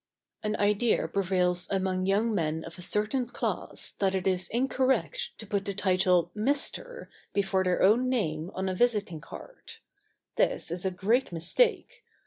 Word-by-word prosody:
An 215 -1 -1
idea 210 +3 +2
prevails 180 -2 +1
among 185 -1 -1
young 215 +4 +2
men 160 -4 -1
of 170 +2 -10
a - - -7
certain 215 +7 0
class 240 - -2
that 195 -1 +1
it 185 - -2
is 185 -2 0
incorrect 265 - 0
to 220 - -8
put 200 -1 -2
the 200 - -3
title 185 -3 +2
"Mr." 285 - -1 0.3
before 195 -1 +1
their 180 -1 +1
own 235 +6 +4
name 165 -10 -1
on 190 +1 -2
a 190 - -1
visiting 205 -6 0
card. - - -11 0.6
This - - +1
is 175 +2 -3
a - - +2
great 215 +8 0
mistake. 455 - +1
195 Hz, 155 wpm, -28 LUFS, 180-230 Hz, 0.6 s, own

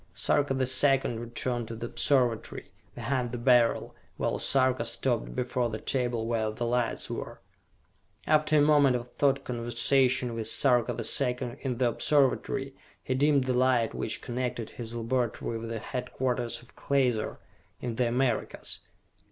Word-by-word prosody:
Sarka 140 -2 +2
the 130 0 +1
Second 130 -2 +3
returned 120 0 -3
to 115 - -6
the 115 +1 -5
Observatory, 120 -2 0 0.2
behind 125 -3 -2
the 120 - -4
Beryl, 120 -1 +3 0.2
while - - -1
Sarka 130 -1 +2
stopped - - -1
before 125 -1 -1
the 110 - -4
table 120 -2 -1
where 115 -2 0
the 110 +2 -4
lights 120 0 -1
were. - - -6 0.9
After 155 0 +3
a 145 - +5
moment 145 -3 +5
of 120 0 -4
thought 140 -1 +1
conversation 125 +1 +1
with 115 -1 -3
Sarka 120 0 +3
the 115 - -4
Second 125 -1 0
in 130 -3 -2
the 125 0 +2
Observatory, 135 0 +1 0.3
he 130 - -1
dimmed 140 +1 +3
the 130 0 -1
light 125 -2 +2
which 110 - -2
connected 125 -2 -3
his 115 -1 -7
laboratory 115 -1 -2
with 115 0 -6
the 115 - -3
headquarters 125 0 -3
of 120 - -19
Klaser, 125 -6 0 0.4
in 120 - -4
the 125 - +2
Americas. 120 -1 -1
125 Hz, 150 wpm, -28 LUFS, 120-130 Hz, 0.9 s, a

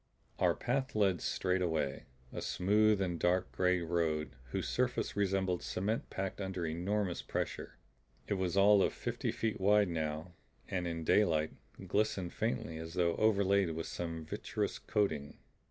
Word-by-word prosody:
Our - - +3
path 130 +1 -1
led 95 -5 +2
straight 90 0 0
away, 80 -6 -1 0.3
a - - -4
smooth 105 +2 +3
and 85 -3 -2
dark 90 +1 +1
gray 90 -1 +2
road 80 -2 -1
whose - - -2
surface 125 0 0
resembled 95 -3 +1
cement 105 +5 -2
packed 95 +1 -4
under 95 -3 -3
enormous 90 +3 -1
pressure. - - -4 0.5
It - - 0
was 95 -1 -1
all 100 +1 +7
of - - +2
fifty - - -2
feet 110 -3 -2
wide 105 0 +4
and - - -3
now, 80 +2 -3 0.3
in 85 -3 -2
daylight, 80 -4 +3 0.3
glistened 100 -4 0
faintly 110 -7 -2
as 80 +1 -7
though 85 -2 +2
overlaid 100 -5 +3
with 80 - -3
some 85 -2 -4
vitreous - - -3
coating. 80 -9 -1
95 Hz, 150 wpm, -34 LUFS, 85-100 Hz, 0.5 s, all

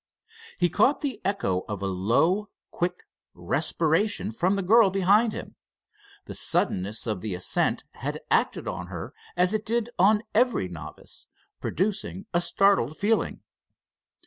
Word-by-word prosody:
He 175 - +3
caught 210 - +2
the 265 -8 -3
echo 195 - 0
of 100 -2 -4
a - - 0
low, 120 - +1 0.2
quick 180 +1 -2 0.3
respiration 160 - 0
from 180 - +1
the 195 - -1
girl 220 +2 +6
behind 200 +4 +3
him. - - -8 0.7
The - - -7
suddenness 100 +4 0
of 105 -6 -2
the 105 -4 -3
ascent 90 - 0
had - - -5
acted - - +1
on - - -4
her - - -7 0.2
as 180 +3 +4
it 215 -1 0
did 235 +1 -1
on 210 +3 +4
every 245 - +2
novice, 80 -3 -10 0.3
producing 195 0 -2
a 175 - +3
startled 175 -5 +2
feeling. 215 +2 0
185 Hz, 140 wpm, -26 LUFS, -, 0.7 s, girl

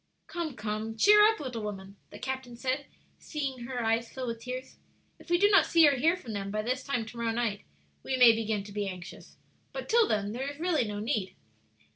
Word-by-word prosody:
"Come, 335 -6 -4
come, 215 +1 -4
cheer 420 - +7
up, 435 +1 +4
little 250 -5 -5
woman," 195 -2 -6
the - - -10
captain 260 -2 -5
said, 265 +3 -2 0.3
seeing 270 -5 -4
her 250 -1 -3
eyes 225 +1 +1
fill 260 -1 -5
with 230 -1 -4
tears. 255 +1 -7 0.4
"If - - -16
we 345 - +4
do 405 +3 +5
not 395 - +6
see 330 -2 +6
or 285 - +4
hear 320 +7 +2
from 230 -10 -8
them 200 -1 -4
by 215 +1 -2
this 255 +3 -2
time 245 -5 -2
to 230 +2 -11
morrow 235 -1 -1
night, 225 -3 -2 0.4
we 260 - -2
may 245 -2 +8
begin 220 -2 -1
to 205 - -11
be 205 0 -2
anxious; 180 -1 -9 0.3
but - - -6
till 460 -2 +4
then 205 -1 0
there 260 +5 -3
is 285 +1 -9
really 330 -7 +1
no 205 0 -4
need." 215 -4 -2
245 Hz, 220 wpm, -29 LUFS, 215-285 Hz, 0.4 s, may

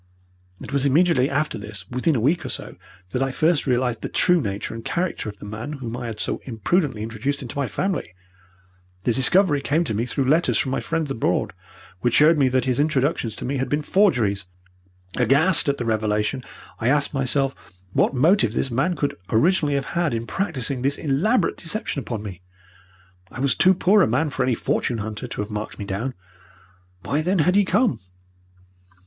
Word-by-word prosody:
"It - - -8
was 140 -1 +1
immediately 140 -1 +3
after 145 -5 -1
this 100 -2 -8
within 125 +5 +1
a - - +1
week 145 +10 +1
or - - -5
so - - -5 0.4
that 125 - -1
I 135 - +1
first 155 +4 +1
realized 125 -2 0
the - - -4
true 180 -2 +3
nature 100 -2 -4
and 115 0 -7
character 175 -8 -2
of 105 - -10
the 105 - -10
man 110 +8 -6
whom 120 -5 -5
I 120 -1 -5
had 110 -2 -6
so - - -2
imprudently 125 - 0
introduced 130 +6 -3
into 120 - -8
my 140 -2 -1
family. 185 - -3 0.9
The 120 - +2
discovery 145 - +3
came 155 +5 +1
to 130 - -3
me 115 +4 -1
through 135 +2 -1
letters 135 -5 +3
from 130 - 0
my - - 0
friends 165 -4 -2
abroad, 125 - 0 0.5
which 120 +4 +1
showed 155 +1 +5
me 135 -2 +4
that 130 +1 +1
his 130 -1 0
introductions 140 -6 0
to - - -6
me 135 +2 -1
had 130 - -2
been 150 +1 0
forgeries. 120 - +2 0.7
Aghast 140 - +4
at 140 - 0
the 120 - -3
revelation, 110 +3 0 0.4
I 115 - -1
asked 145 +3 +2
myself 135 0 +1 0.4
what - - +2
motive 145 - +3
this 135 - -1
man 135 +10 +1
could 145 -2 -2
originally 150 +4 +2
have 140 -1 -1
had 170 -7 0
in 115 0 -3
practising 140 -7 -2
this 140 +2 0
elaborate 165 - +1
deception 170 -3 -3
upon 115 -5 -5
me. 95 -4 -8 0.9
I - - -9
was 140 0 +2
too 185 +1 +4
poor 200 +4 +4
a - - +4
man 145 +7 0
for 135 - -3
any 130 -1 +2
fortune 120 +1 -1
hunter 110 +3 -5
to 120 - -4
have 105 +1 -6
marked 105 0 -5
me 100 - -5
down. 110 +6 -3 0.9
Why, 145 +2 0
then, 185 +5 +1
had 180 - +3
he 205 0 +4
come? 240 +3 +2
135 Hz, 195 wpm, -23 LUFS, 115-155 Hz, 0.9 s, showed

